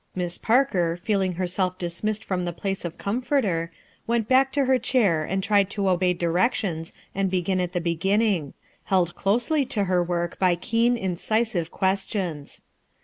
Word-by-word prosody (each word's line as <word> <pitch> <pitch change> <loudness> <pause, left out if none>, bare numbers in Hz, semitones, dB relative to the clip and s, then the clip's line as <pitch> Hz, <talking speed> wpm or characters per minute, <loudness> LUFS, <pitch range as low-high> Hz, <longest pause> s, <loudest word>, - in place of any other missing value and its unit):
Miss 175 -1 -3
Parker, 190 -9 +2
feeling 190 0 0
herself 185 +1 -1
dismissed 190 +5 -3
from 185 -2 -1
the 175 - -2
place 195 +2 -4
of 165 - -5
com 215 +6 -2
forter, 210 - 0 0.4
went 230 -2 0
back 265 +2 +4
to 280 -2 +2
her 260 0 +3
chair 210 - +2
and 190 +4 -2
tried 200 -1 +3
to 200 -1 -2
obey 185 0 +2
directions 170 -1 0 0.2
and 195 0 0
begin 185 0 0
at 180 0 -3
the 175 - -1
beginning; 180 -1 0 0.3
held 180 -3 +1
closely 235 - +1
to 220 -6 -1
her 180 -2 +2
work 175 -1 -2
by 185 -2 +3
keen 230 +7 +1
incisive 190 -1 -1
questions. 190 -6 -2
190 Hz, 160 wpm, -25 LUFS, 175-215 Hz, 0.4 s, back